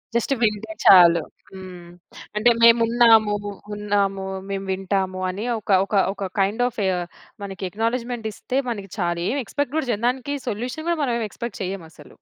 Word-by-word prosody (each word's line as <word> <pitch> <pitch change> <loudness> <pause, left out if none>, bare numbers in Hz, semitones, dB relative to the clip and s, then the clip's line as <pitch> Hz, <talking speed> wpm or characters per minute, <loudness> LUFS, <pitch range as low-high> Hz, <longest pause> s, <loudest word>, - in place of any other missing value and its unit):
Just 235 +4 +1
వింటే 220 -1 0
చాలు 170 -3 +8 0.3
హ్మ్. 180 -2 -10 0.5
అంటే 235 +3 +4
మేము 230 0 +7
ఉన్నాము, 225 -3 +5 0.4
ఉన్నాము 200 -2 -1 0.2
మేము 195 0 -3
వింటాము 190 0 -2
అని 200 +5 -4
ఒక 210 - -19 0.2
ఒక 205 - -3 0.2
ఒక 195 -1 -4
కైండ్ 210 +5 +1
ఆఫ్ 230 - -7 0.6
మనకి 195 -1 -7
అక్‌నాలెడ్జ్‌మెంట్ 230 +2 -2
ఇస్తే 260 +6 -2
మనకి 200 -4 -5
చాలు. 175 -3 -1
ఏమి 280 +2 -1
ఎక్స్‌పెక్ట్ 285 +4 -3
గూడా 315 -5 -1
జేయం 220 +1 -3
దానికి 265 +3 -3
సొల్యూషన్ 245 +8 -4
గూడా 340 - +1
మనం 245 -3 0
ఏం 225 - -2
ఎక్స్‌పెక్ట్ 235 0 -7
చెయ్యం 185 -1 -4
అసలు. 150 -3 -16
210 Hz, 160 wpm, -22 LUFS, 195-240 Hz, 0.6 s, చాలు